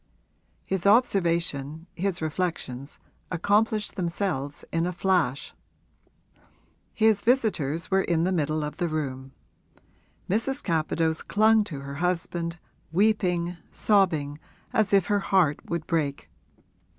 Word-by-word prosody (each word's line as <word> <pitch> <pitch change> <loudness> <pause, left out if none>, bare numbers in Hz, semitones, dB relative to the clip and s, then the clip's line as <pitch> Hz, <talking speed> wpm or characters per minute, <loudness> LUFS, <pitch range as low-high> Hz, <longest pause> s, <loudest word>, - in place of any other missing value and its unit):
His 190 0 -1
observation, 170 - +2
his 185 -2 -2
reflections, 155 -5 -3 0.3
accomplished 210 +4 +1
themselves 170 -6 -2
in 165 +1 0
a - - -1
flash. 175 -7 0 1.4
His 220 -2 +3
visitors 200 - +1
were 195 0 +4
in 170 -3 +1
the 185 - +1
middle 155 -3 0
of 150 0 -5
the 175 - 0
room; 135 -4 -4 1.0
Mrs. 260 +8 0
Capadose 160 -1 0
clung 220 +1 +4
to 145 -8 -6
her 140 0 -7
husband, 170 -1 -1 0.3
weeping, 180 -3 +1
sobbing 160 -8 +2 0.3
as 220 -4 +2
if 195 -3 +4
her 205 +1 +1
heart 185 -7 +2
would 170 -2 -2
break. 140 - -2
170 Hz, 115 wpm, -26 LUFS, 155-200 Hz, 1.4 s, were